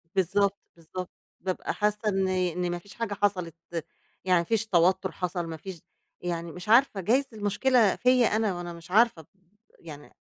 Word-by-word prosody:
بالضبط، 195 +2 +2 0.2
بالضبط، 175 +2 -7 0.3
بابقى 185 0 -2
حاسة 210 0 0
إن 195 -2 +1
إن 180 -1 0
ما 175 - -2
فيش 200 +2 -15
حاجة 230 -3 -3
حصلت، 185 -5 -1 0.7
يعني 180 -2 +4
ما - - 0
فيش 225 +5 0
توتُر 185 0 +3
حصل، 180 -1 -3
ما 160 -1 -6
فيش 185 -1 -9 0.4
يعني 170 -1 -3
مش 180 +5 -9
عارفة، 230 -4 +5
جايز 255 +9 +2
المشكلة 215 +2 +2
فيَّ 250 -1 +4
أنا 215 -3 0
وأنا 175 -1 -6
مش 170 +2 -13
عارفة، 215 -7 +3 0.5
يعني 150 -3 -11
190 Hz, 165 wpm, -27 LUFS, 175-210 Hz, 0.7 s, عارفة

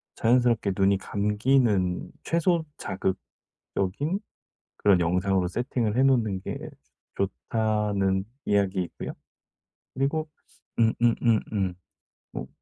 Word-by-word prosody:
자연스럽게 120 -3 +3
눈이 100 0 +4
감기는 105 -2 +1
최소 170 0 +1
자극적인 95 - -3 0.6
그런 100 -3 +4
영상으로 90 +2 +1
세팅을 120 +1 -1
해 - - +5
놓는 115 -8 +2
게 - - -4 0.6
좋다는 100 -1 0 0.2
이야기이고요. 95 -3 0 0.8
그리고 150 +4 0 0.5
음음음음. 110 -4 +2 0.6
뭐 - - -5
105 Hz, 220 characters per minute, -26 LUFS, 95-120 Hz, 0.8 s, 해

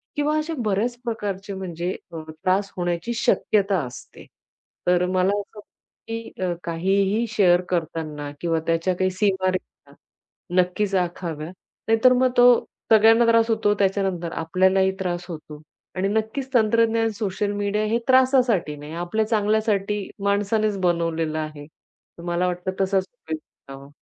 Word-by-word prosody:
किंवा 295 +1 +1
अशा 310 +2 -2
बऱ्याच 215 +4 0
प्रकारचे 205 -4 -4
म्हणजे 180 -1 -4 0.2
अ, 165 -1 -6
त्रास 185 +5 -1
होण्याची 175 +5 -2
शक्यता 200 -4 +2
असते. 125 -1 -11 0.6
तर 180 0 +3
मला 185 +1 +1
असं 205 +1 -10
वाटतं, - - -8 0.5
की 230 0 -5
अ, 180 -1 0
काहीही 195 +6 +1
शेअर 185 -5 +4
करताना 155 -4 -3
किंवा 165 -1 0
त्याच्या 165 +2 +1
काही 185 +1 +1
सीमारेषा 185 -1 -2 0.7
नक्कीच 195 +2 -1
आखाव्या. 170 -3 -3 0.4
नाहीतर 225 +3 +5
मग 255 0 +3
तो 245 0 +8 0.5
सगळ्यांना 225 +2 +6
त्रास 230 0 +4
होतो. 220 -2 +2
त्याच्यानंतर 190 -3 0
आपल्यालाही 190 +4 +2
त्रास 175 -2 -3
होतो 155 -2 -9 0.3
आणि 190 +1 0
नक्कीच 220 +6 -2
तंत्रज्ञान, 225 0 +3
सोशल 205 -1 -2
मीडिया 205 +1 -1
हे 220 +2 +1
त्रासासाठी 255 - +3
नाही, 150 +2 -9
आपल्या 175 +6 -1
चांगल्यासाठी 210 -2 0
माणसानेच 205 +1 +1
बनवलेलं 165 -3 0
आहे. 155 -1 -6
तर 170 +2 -20
मला 175 +1 0
वाटतं, 180 +1 -2
तसाच 190 0 +2
उपयोग 160 -10 -6 0.3
करावा. 135 0 -10
195 Hz, 135 wpm, -23 LUFS, 175-220 Hz, 0.7 s, तो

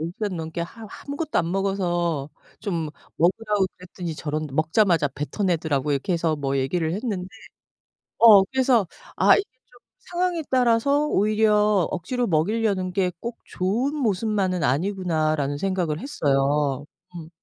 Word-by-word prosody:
10 160 +2 -3
시간 205 -4 -3
넘게 160 +1 -5
하우 220 +5 -9 0.2
아무것도 285 +2 -2
안 170 -1 0
먹어서 175 -6 -1 0.3
좀 170 -7 -2 0.3
먹으라고 200 +3 +1
그랬더니 175 -2 -7
저런 155 +1 -3
먹자마자 160 +1 +2
뱉어내더라."라고 150 -1 -1 0.2
해서 165 -3 +1
뭐 140 -1 -2
얘기를 160 +5 0
했는데 200 -4 -3 0.9
어 215 -4 +9
그래서 255 -5 +3 0.3
'아 - - +6
이게 405 - 0 0.2
좀 245 - -21 0.2
상황에 350 -2 -2
따라서 260 +4 +3
오히려 210 - +2
억지로 240 +8 -2
먹이려는 190 +2 0
게 185 -1 +1
꼭 235 0 -6
좋은 230 +10 -1
모습만은 200 - 0
아니구나.'라는 155 -2 0
생각을 180 -4 -1
했어요. 145 - 0 0.3
음. 160 -2 -8
185 Hz, 310 characters per minute, -24 LUFS, 160-220 Hz, 0.9 s, 어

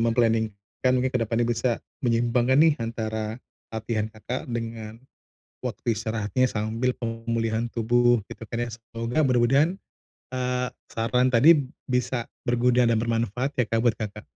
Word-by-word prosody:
mem-planning 115 -1 +3 0.4
kan 130 - +4
mungkin 130 0 +1
ke - - +3
depannya 115 +1 0
bisa 120 0 0 0.2
menyeimbangkan 120 +2 +2
nih 155 -1 +6
antara 110 -1 -3 0.3
latihan 110 -1 -2
Kakak 110 +3 -5
dengan 115 -1 -5 0.6
waktu 120 - -2
istirahatnya 110 +3 0
sambil 115 +3 -1
pemulihan 115 0 -2
tubuh, 120 -1 +2
gitu - - -8
kan 120 0 -2
ya. 120 - -4
Semoga 115 +3 -4
mudah-mudahan, 135 +7 +3 0.6
eee, 125 0 -1 0.2
saran 125 +3 +1
tadi 145 +3 +6 0.2
bisa 125 -1 -1 0.2
berguna 120 0 +3
dan 115 -1 +3
bermanfaat 115 +3 -1
ya, 125 - +4
Kak, 115 - 0
buat 120 -2 +3
Kakak. 105 -1 -5
115 Hz, 140 wpm, -25 LUFS, 115-125 Hz, 0.6 s, nih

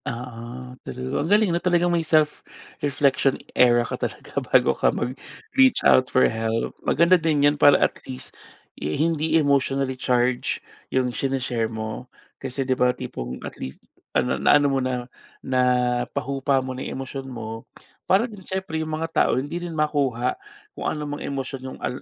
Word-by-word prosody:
Oo, 125 +1 -7
true. 130 +2 -4
Ang 155 - -2
galing, 210 -3 +4
'no, 170 - 0
talagang 175 -1 +2
may 170 - +2
self-reflection 145 -3 0 0.2
era 120 -1 +5
ka - - -5
talaga - - -5 0.2
bago - - +4
ka - - +2
mag-reach 250 - 0
out 130 0 +5
for 130 - +4
help. 115 0 -1
Maganda 170 +3 +4
din 150 -3 +2
'yan 145 - +5
para, 145 -1 +8
at - - +2 0.2
least, 130 0 -8 0.5
eh, 75 +1 -2
hindi 160 0 +2
emotionally-charged 130 -4 +1 0.3
yung 125 -1 0
shine-share 125 -4 -1
mo 110 +2 -6 0.3
kasi, 135 0 -3
'di 130 - +2
ba, 125 0 +2
tipong 60 +1 -6
at - - -6
least, 65 - -6 0.4
ah, - - +2
na-ano 145 +3 +3
mo 135 - +2
na, 125 -1 -2 0.4
napahupa 125 +2 +1
mo 130 - -4
na 130 - -7
yung - - -5
emosyon 135 0 -7
mo, 115 -2 -7 0.4
para 195 +5 +4
din 210 -6 -10
siyempre, 190 -3 -3
yung 160 - -4
mga 165 +1 -2
tao, - - +2
hindi 145 +6 -3
rin 170 -2 -5
makuha 140 -5 +1 0.4
kung - - -3
ano 150 -1 -3
mang 145 - -6
emosyon 135 -1 -4
yung, 130 0 -7
al 125 - -4
135 Hz, 165 wpm, -24 LUFS, 125-155 Hz, 0.5 s, para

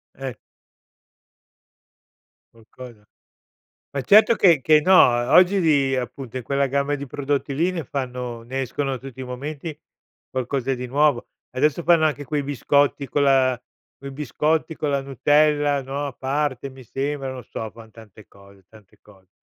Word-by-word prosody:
Eh. 135 -1 -6 2.2
Qualcosa. 115 -1 -14 0.9
Ma 140 - -2
certo 215 - +6
che 170 -8 +4
che 155 +3 +4
no, 185 +5 +2
o 120 -8 +4
oggi 185 +2 +5
di 140 -5 +2
appunto 130 0 -6
in 130 - -3
quella 140 +3 0
gamma 140 +2 -1
di 140 0 -7
prodotti 140 +1 -2
lì 165 +6 +1
ne 170 -4 -4
fanno 125 -3 -5
ne 130 +3 -4
escono 135 +1 -3
tutti 130 0 -10
i - - -4
momenti 145 +5 -6 0.5
qualcosa 130 +1 -2
di 125 0 -6
nuovo. 140 -1 +1 0.2
Adesso 150 +5 0
fanno 165 -1 +4
anche 145 -1 -3
quei 145 +2 -2
biscotti 140 +1 0
con 145 - 0
la 130 -3 +3 0.4
quei 140 - -9
biscotti 150 +3 -1
con 150 - -2
la 140 -1 0
Nutella 145 +2 +2
no, 140 +2 -4
a 140 - -6
parte 135 0 -2
mi 130 0 -14
sembra, 135 +2 -4
non 130 -2 -8
so, 110 - -6
fan 110 +1 -15
tante 110 -1 -16
cose, 100 -1 -20
tante 105 -1 -20
cose. 95 -3 -21
135 Hz, 160 wpm, -22 LUFS, 125-145 Hz, 2.2 s, certo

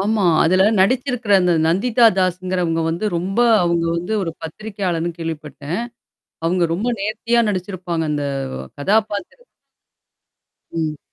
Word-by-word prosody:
ஆமா. 210 +1 +1 0.2
அதுல 185 +3 +4 0.2
நடிச்சிருக்கற 250 0 +1
அந்த 180 -1 +3
நந்திதா 225 +8 +3
தாஸ்ஸுங்கறவங்க 180 -2 0
வந்து 170 +5 -2
ரொம்ப 185 +5 -3 0.3
அவங்க 170 -1 +1
வந்து 175 +5 -3
ஒரு 165 -3 -3
பத்திரிகையாளர்ன்னு 175 -2 -3
கேள்விப்பட்டேன். 155 -1 -5 0.7
அவங்க 175 +2 +1
ரொம்ப 210 +8 -2
நேர்த்தியா 230 +3 0
நடிச்சிருப்பாங்க. 180 -3 -3
அந்த 145 -1 -1 0.5
கதாபாத்திரம். 215 - -1 1.3
ம். 155 -3 -2
185 Hz, 110 wpm, -20 LUFS, 165-210 Hz, 1.3 s, அதுல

